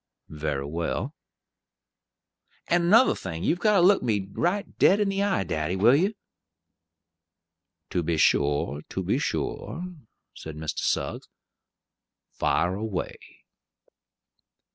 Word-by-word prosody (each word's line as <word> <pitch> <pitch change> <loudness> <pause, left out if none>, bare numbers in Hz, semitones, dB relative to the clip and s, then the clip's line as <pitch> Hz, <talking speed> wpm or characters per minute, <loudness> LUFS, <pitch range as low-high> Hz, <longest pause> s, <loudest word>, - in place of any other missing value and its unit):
"Very 75 -3 -3
well." 85 +3 -3 1.5
"And 175 0 +2
another 225 +8 +6
thing: 85 -3 -6
you've 175 - +1
got 210 +2 +3
to 190 - +5
look 195 +1 +5
me 105 -5 -1
right 185 - 0
dead 200 - +5
in 205 -1 +1
the 195 0 -1
eye, 200 - +1
daddy; 80 +1 -2
will 115 +7 +5
you?" 195 +8 +1 1.8
"To 90 - 0
be 85 0 -1
sure, 70 -1 +2
to - - -3
be - - 0
sure," 170 - -3 0.5
said 80 -1 -9
Mr. 75 0 -4
Suggs; - - -2 1.0
"fire 90 +1 0
away." 100 -2 -4
95 Hz, 120 wpm, -26 LUFS, -, 1.8 s, another